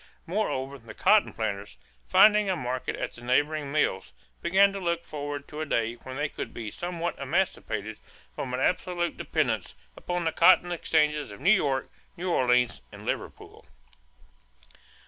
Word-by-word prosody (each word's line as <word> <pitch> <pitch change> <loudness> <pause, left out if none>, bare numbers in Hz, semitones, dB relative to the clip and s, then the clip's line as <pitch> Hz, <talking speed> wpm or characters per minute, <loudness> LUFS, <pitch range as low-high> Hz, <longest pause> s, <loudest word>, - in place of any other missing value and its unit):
Moreover, 140 -8 -2
the 115 - -11
cotton 215 -1 +4
planters, 100 - -4 0.3
finding 210 - +6
a 185 - +2
market 125 -4 -3
at - - -4
the 120 - -12
neighboring 145 +4 +1
mills, 95 - 0 0.3
began 195 +3 +4
to 200 - -4
look 170 -2 -1
forward 145 -1 -5
to 150 +1 -6
a - - -1
day 115 -3 0
when 130 +2 -9
they 145 0 -1
would - - -5
be 110 -3 -5
somewhat 175 -1 -4
emancipated 130 - -2 0.3
from 130 - -5
absolute 175 +5 0
dependence - - -1 0.2
upon 175 -1 -3
the 160 - +2
cotton 175 +2 +5
exchanges 150 -3 +1
of - - -10
New 175 +8 +4
York, 140 -9 +1 0.3
New 180 +1 -2
Orleans, 125 -4 +2
and - - -11
Liverpool. - - -5
150 Hz, 150 wpm, -27 LUFS, 125-175 Hz, 0.3 s, finding